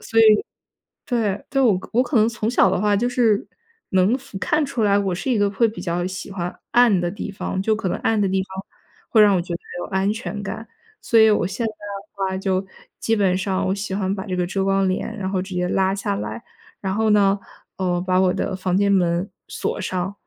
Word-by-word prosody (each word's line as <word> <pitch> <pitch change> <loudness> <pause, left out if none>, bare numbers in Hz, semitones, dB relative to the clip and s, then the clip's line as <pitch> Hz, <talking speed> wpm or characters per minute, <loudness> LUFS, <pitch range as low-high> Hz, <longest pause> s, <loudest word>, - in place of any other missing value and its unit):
所 225 - -1
以， - - +8 0.8
对， 215 -6 -1
就 270 -1 +2
我 200 -5 +4
可 - - -10
我 250 +2 +4
可 250 -1 0
能 215 +1 +5
从 225 -1 -2
小 195 -6 +4
的 180 - 0
话 205 0 +2
就 240 +4 +1
是 235 -5 +2 0.4
能 190 +7 +3
服 255 -7 -10
看 300 +8 +1
出 245 -5 -2
来 200 -1 +4
我 195 -2 0
是 260 +8 -2
一 230 - +2
个 205 -1 +2
会 225 +3 +2
比 215 -5 -7
较 175 -1 -1
喜 185 +1 -6
欢 180 -2 -5
暗 235 -6 +5
的 175 - 0
地 195 - -6
方， 190 -1 -3
就 220 +2 +1
可 210 -3 -3
能 - - -1
暗 225 -1 +1
的 200 - +2
地 190 0 +1
方 190 0 -8 0.4
会 220 - +5
让 205 -2 +6
我 175 - +1
觉 175 0 -6
得 170 - -3 0.2
有 - - -4
安 190 +2 +1
全 215 -2 -5
感。 220 +3 -6 0.3
所 230 - +3
以 220 0 +7
我 205 -4 +2
现 210 +5 -3
在 220 - -1
的 205 -1 -9 0.2
话， 190 - -3
就 190 0 -1 0.3
基 225 - +1
本 190 -3 +2
上 190 0 -1
我 190 - +1
喜 200 -1 -4
欢 190 -1 -1
把 195 0 -5
这 185 -3 -3
个 180 -1 0
遮 195 +2 -1
光 195 0 +2
帘 220 +4 -3
然 190 -1 -3
后 190 -2 -1
直 190 -1 -7
接 180 0 0
拉 190 0 +1
下 195 - -2
来， 105 +2 -5 0.4
然 190 -1 -2
后 220 +1 +1
呢， 200 -1 +4 0.4
呃， 180 -2 0
把 185 0 +1
我 185 -1 +3
的 195 0 -2
房 185 -1 -1
间 200 +1 +3
门 175 0 +1 0.2
锁 - - -3
上， 185 0 -2
195 Hz, 260 characters per minute, -22 LUFS, 185-215 Hz, 0.8 s, 以